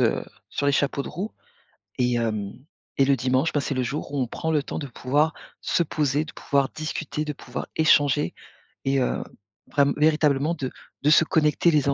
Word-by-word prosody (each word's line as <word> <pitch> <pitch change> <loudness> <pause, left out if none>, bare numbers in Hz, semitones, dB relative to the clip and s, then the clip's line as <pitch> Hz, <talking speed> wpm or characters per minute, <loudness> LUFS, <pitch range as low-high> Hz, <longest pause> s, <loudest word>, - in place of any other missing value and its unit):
heu, - - +2 0.2
sur 140 - -2
les 140 - +4
chapeaux 140 0 +1
de - - -7
roue 195 +7 -5 0.7
et 125 -1 +2
hem 110 -4 -1 0.4
et 135 - +5
le 140 0 +4
dimanche, 130 +5 +1
ben, 145 - +1
c'est 140 - -2
le 130 -1 0
jour 140 +3 -4
où 140 - 0
on 125 - 0
prend 160 +7 -3
le 150 -3 +2
temps - - -5
de 140 - -5
pouvoir 145 +6 +1 0.3
se 170 - +1
poser, 150 -2 0
de - - -9
pouvoir 140 -1 +1
discuter, 155 0 -3
de 150 - -3
pouvoir 125 -2 -6
échanger 145 -2 +3 0.5
et 135 0 +2
heu, 125 - 0 0.4
vraim 140 -1 +2
véritablement 150 0 +3
de 130 -5 -4 0.3
de 145 - +4
se 155 - +7
connecter 155 +2 +3
les 150 -3 +2
uns 140 - +3
140 Hz, 200 wpm, -25 LUFS, 135-150 Hz, 0.7 s, se